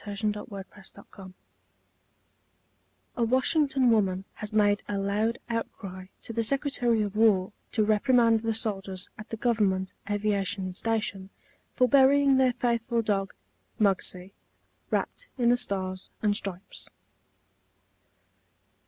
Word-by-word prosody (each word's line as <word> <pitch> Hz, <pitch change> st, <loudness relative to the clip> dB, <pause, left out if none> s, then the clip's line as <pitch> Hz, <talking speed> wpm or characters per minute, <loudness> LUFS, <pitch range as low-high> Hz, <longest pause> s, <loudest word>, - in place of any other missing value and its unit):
THE 205 Hz, -1 st, -6 dB
FLAG 210 Hz, -, -6 dB
AND 210 Hz, -1 st, +2 dB, 0.2 s
THE 200 Hz, -2 st, -6 dB
FAITHFUL 190 Hz, -1 st, -13 dB, 1.8 s
(A 240 Hz, -, +1 dB
Washington 260 Hz, +1 st, +3 dB
woman 195 Hz, -4 st, +1 dB
has 210 Hz, -, -6 dB
made 205 Hz, -1 st, +3 dB
a 205 Hz, -, -1 dB
loud 210 Hz, +4 st, 0 dB
outcry 195 Hz, -5 st, -5 dB, 0.2 s
to 230 Hz, -, -6 dB
the 230 Hz, -, 0 dB
Secretary 245 Hz, -3 st, +1 dB
of 205 Hz, -1 st, -5 dB
War 210 Hz, -3 st, +3 dB, 0.2 s
to 215 Hz, -3 st, +2 dB
reprimand 230 Hz, +1 st, +3 dB
the 225 Hz, 0 st, -2 dB
soldiers 195 Hz, -4 st, -3 dB
at 215 Hz, -, -9 dB
the 225 Hz, -, -5 dB
Government 205 Hz, -5 st, 0 dB, 0.2 s
Aviation 200 Hz, -2 st, -1 dB
Station 205 Hz, -2 st, -2 dB, 0.5 s
for 250 Hz, -, +4 dB
burying 275 Hz, +1 st, +5 dB
their 260 Hz, -1 st, +3 dB
faithful 235 Hz, -1 st, 0 dB
dog, 195 Hz, -2 st, -1 dB, 0.4 s
Muggsie, 190 Hz, -2 st, +1 dB, 0.6 s
wrapped -, -, -2 dB
in 240 Hz, -2 st, +3 dB
the 245 Hz, -, +5 dB
Stars 185 Hz, -4 st, -4 dB
and 205 Hz, -1 st, +2 dB
Stripes.) 195 Hz, -3 st, -5 dB
215 Hz, 125 wpm, -27 LUFS, 195-235 Hz, 1.8 s, burying